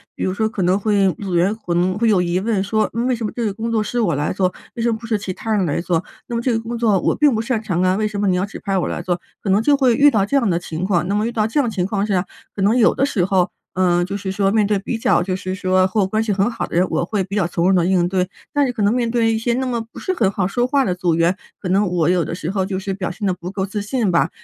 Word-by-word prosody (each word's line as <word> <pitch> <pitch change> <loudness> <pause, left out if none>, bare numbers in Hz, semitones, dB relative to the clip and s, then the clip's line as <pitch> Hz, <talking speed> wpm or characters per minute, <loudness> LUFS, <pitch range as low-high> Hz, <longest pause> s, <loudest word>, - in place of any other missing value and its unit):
比 - - -4
如 185 - -1
说 220 +2 0
可 205 -4 -3
能 180 +2 +3
会 200 -2 +2
组 190 -3 -3
员 185 +5 +2
可 180 -6 -4
能 185 +2 +1
会 230 +1 +2
有 195 -4 +4
疑 175 +1 0
问 215 -1 0
说： 215 +2 0
“嗯， 235 +2 -1
为 255 - +2
什 230 - -6
么 210 - -3
这 235 - -2
个 205 - -1
工 230 +3 -4
作 225 -1 +1
是 240 +3 -1
我 175 -9 +1
来 145 +2 -1
做， 185 -1 0 0.2
为 235 - -3
什 235 - +2
么 220 - -1
不 230 - -11
是 220 -2 +1
其 200 -2 -5
他 220 +4 -5
人 195 -3 +1
来 145 - -1
做？ 170 0 0 0.2
那 240 - -4
么 230 - 0
这 250 - 0
个 225 - +1
工 230 +1 -5
作 220 -5 +2
我 - - +1
并 295 -2 +4
不 220 - 0
擅 230 -1 -2
长 185 -5 -1
啊， 185 0 +3
为 215 +2 0
什 210 -1 -3
么 205 - +1
你 185 - +2
要 180 +2 0
指 205 - -9
派 195 -1 -1
我 180 - 0
来 - - -3
做？” 175 0 -2 0.2
可 200 - -3
能 195 +3 +4
就 285 +5 +3
会 255 -4 +3
遇 290 +4 +6
到 210 -5 +2
这 240 - -2
样 250 -7 +3
的 170 -1 +1
情 170 -1 -5
况。 175 -3 +1
那 200 - 0
么 210 +1 +1
遇 235 - -2
到 220 -2 0
这 225 - -4
样 275 -5 +3
情 190 -5 -1
况 200 +1 -1
下， 190 -3 0 0.3
可 200 - -5
能 205 +4 +3
有 240 - +5
的 275 - +1
时 210 -10 0
候， 185 -2 +2 0.2
呃， 175 -1 +2
就 195 +2 -4
是 190 -1 -4
说 195 0 +1
面 210 -1 +2
对 210 0 +1
比 205 +4 -3
较 220 - +2
就 185 +1 -2
是 185 0 -4
说 185 -1 +2
和 205 +3 0
我 - - +3
关 215 +3 0
系 215 -2 0
很 195 +4 +1
好 - - -4
的 - - -7
人， 180 +2 +4
我 - - 0
会 200 +1 -1
比 190 +2 -6
较 185 -4 +2
从 170 0 -1
容 - - +4
地 175 -2 +3
应 180 -1 +2
对。 185 -1 0 0.2
但 290 -1 +2
是 250 - -2
可 225 - -4
能 205 +2 +3
面 240 -2 0
对 230 -1 +2
一 - - 0
些 235 +1 0
那 260 +2 -1
么 245 -2 -1
不 - - -12
是 375 - -2
很 220 - +2
好 195 -2 -1
说 240 +6 0
话 275 +1 +2
的 185 - 0
组 180 -2 0
员， 170 +3 +2 0.2
可 185 - -4
能 195 +2 +2
我 175 -2 +1
有 180 -2 +2
的 - - -4
时 170 0 -4
候 195 -1 0
就 190 -1 -3
是 195 0 -3
表 190 -2 -3
现 205 +3 -5
得 190 - +2
不 180 0 -7
够 190 0 -2
自 205 +1 -4
信 210 -1 0
吧， 170 - +2
200 Hz, 365 characters per minute, -20 LUFS, 185-225 Hz, 0.3 s, 遇